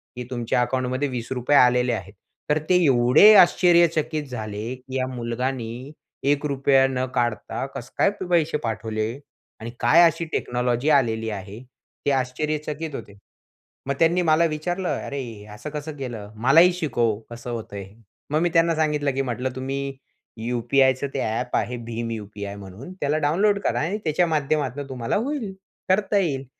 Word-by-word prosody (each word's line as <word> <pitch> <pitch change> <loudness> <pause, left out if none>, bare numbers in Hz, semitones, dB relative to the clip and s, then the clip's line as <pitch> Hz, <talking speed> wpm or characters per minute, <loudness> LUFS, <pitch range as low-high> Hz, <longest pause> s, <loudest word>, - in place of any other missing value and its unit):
की 125 - -5
तुमच्या 120 -1 0
अकाउंटमध्ये 130 +2 -1
₹20 120 -2 -5
रुपये 130 +3 +1
आलेले 125 0 +4
आहेत. 95 -3 -5 0.4
तर 150 - +3
ते 180 - +5
एवढे 130 - +7
आश्चर्यचकित 170 -4 +4
झाले 110 +1 -5
की, 130 +1 -10
"या 130 0 -1
मुलगाने 125 +1 -4 0.4
1 145 +1 0
रुपया 135 -1 +3
न 130 -1 -1
काढता 120 +1 -1
कसं 120 - -7
काय - - +4 0.2
पैसे 165 -3 +2
पाठवले? 110 -1 -2 0.5
आणि 115 +1 -6
काय 170 - +5
अशी 165 0 +1
टेक्नॉलॉजी 125 +3 0
आलेली 110 -5 +2
आहे?" 100 0 -7 0.5
ते 145 - +3
आश्चर्यचकित 150 +3 -2
होते. 100 -3 -9 0.7
मग 140 - +1
त्यांनी 170 +2 +3
मला 165 0 +3
विचारलं, 175 +4 -2 0.2
"अरे, 140 - -4
हे 110 -5 -9
असं 130 +8 -7
कसं 150 0 -6
केलं? 115 -6 -6
मलाही 155 +11 +5
शिकव, 120 -11 0
कसं 120 +1 -8
होतं 115 -3 -6
हे. 100 0 -9 0.4
मग 155 - +2
मी 175 - +2
त्यांना 165 0 +3
सांगितलं 150 -2 +1
की 135 - +1
म्हटलं, 125 0 -2
"तुम्ही 135 +1 -4 0.5
यूपीआयचं 130 +3 +2
ते 140 - -2
ॲप 125 +2 -2
आहे 125 +1 -2
भीम 115 0 -4
यूपीआय 100 -2 -6
म्हणून, 100 - -10
त्याला 145 +1 +1
डाउनलोड 195 +8 +2
करा - - -1
आणि 180 +7 -1
त्याच्या 160 +3 +2
माध्यमातून 145 -3 -1
तुम्हाला 125 -3 -2
होईल, 235 -2 -2 0.4
करता 200 +2 +2
येईल" 140 -8 0
130 Hz, 160 wpm, -23 LUFS, 120-155 Hz, 0.7 s, एवढे